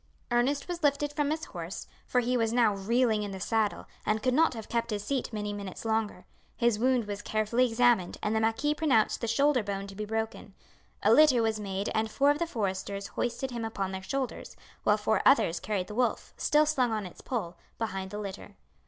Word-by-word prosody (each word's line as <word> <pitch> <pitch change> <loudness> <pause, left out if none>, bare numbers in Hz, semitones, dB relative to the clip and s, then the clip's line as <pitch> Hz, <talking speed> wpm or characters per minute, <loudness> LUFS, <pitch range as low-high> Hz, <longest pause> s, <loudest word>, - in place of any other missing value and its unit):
Ernest 260 +4 +1
was 350 -1 -4
lifted 290 0 +1
from 290 -1 0
his 315 +1 -2
horse, 170 0 -7 0.2
for 250 - +2
he 250 +1 0
was 225 -2 +1
now 235 -3 +4
reeling 220 +2 +1
in 205 - -3
the 190 -1 -6
saddle, 220 +2 0 0.2
and 215 0 0
could 255 -1 +2
not 315 -1 +3
have 220 -2 -7
kept 235 0 -1
his 205 -2 -2
seat 265 +3 -2
many 210 -1 -3
minutes 200 0 -7
longer. 220 -1 -1 0.3
His 235 -3 +2
wound 250 -1 +2
was 205 0 -5
carefully 220 +4 +1
examined, 235 -5 +2
and 210 +1 0
the - - +3
marquis 225 +7 +1
pronounced 295 -8 +2
the 230 - -1
shoulder 270 +3 +3
bone 200 -1 -4
to 195 - -9
be 210 +1 -4
broken. 220 -2 -4 0.5
A 215 - +6
litter 265 -4 +6
was 220 -1 0
made 195 -1 -3
and 220 0 0
four 280 +5 +3
of 290 - -1
the 340 - 0
foresters 200 - -3
hoisted 250 +2 -2
him 235 -1 -4
upon 200 -4 -3
their 190 0 -5
shoulders, 265 +6 -4 0.3
while 210 - +4
four 215 +1 +1
others 180 -11 +4
carried 200 -4 -2
the 210 - -9
wolf, 240 +1 -1
still 300 +1 +3
slung 260 -6 +1
on 215 -2 -2
its 180 - -11
pole, 195 -9 -3 0.2
behind 195 -4 -3
the 205 - -6
litter. 200 0 -7
225 Hz, 215 wpm, -29 LUFS, 205-255 Hz, 0.5 s, A